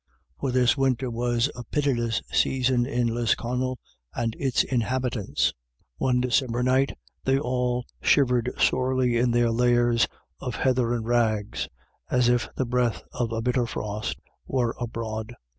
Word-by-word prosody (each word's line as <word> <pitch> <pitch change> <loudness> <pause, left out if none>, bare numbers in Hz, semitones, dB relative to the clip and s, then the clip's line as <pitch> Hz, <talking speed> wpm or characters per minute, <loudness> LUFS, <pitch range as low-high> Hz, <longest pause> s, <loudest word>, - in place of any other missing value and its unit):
For 135 - -1
this 125 -1 +3
winter 130 -2 0
was 120 +3 0
a 125 - -7
pitiless 120 -6 0
season 125 -2 +2
to 125 -2 0
Lisconnel 120 +2 0 0.4
and 115 -1 -1
its 135 -3 +2
inhabitants. 125 -3 0 0.4
One 125 -1 +2
December 125 -1 +1
night 130 +2 +2 0.3
they 135 0 +3
all 125 -2 -1 0.2
shivered 125 -3 +3
sorely 130 -2 +2
in 120 +1 +2
their 120 0 +3
lairs 120 0 +3 0.3
of 125 -2 -4
heather 125 -2 +1
and 115 -2 -3
rags, 110 -3 0 0.4
as 125 -1 +3
if 120 -2 +1
the 130 - 0
breath 120 -5 0
of 120 -2 -2
a 115 0 -2
bitter 125 0 +1
frost 105 -1 -4 0.3
were 120 -3 0
abroad. 115 -1 -4
120 Hz, 140 wpm, -26 LUFS, 115-130 Hz, 0.4 s, this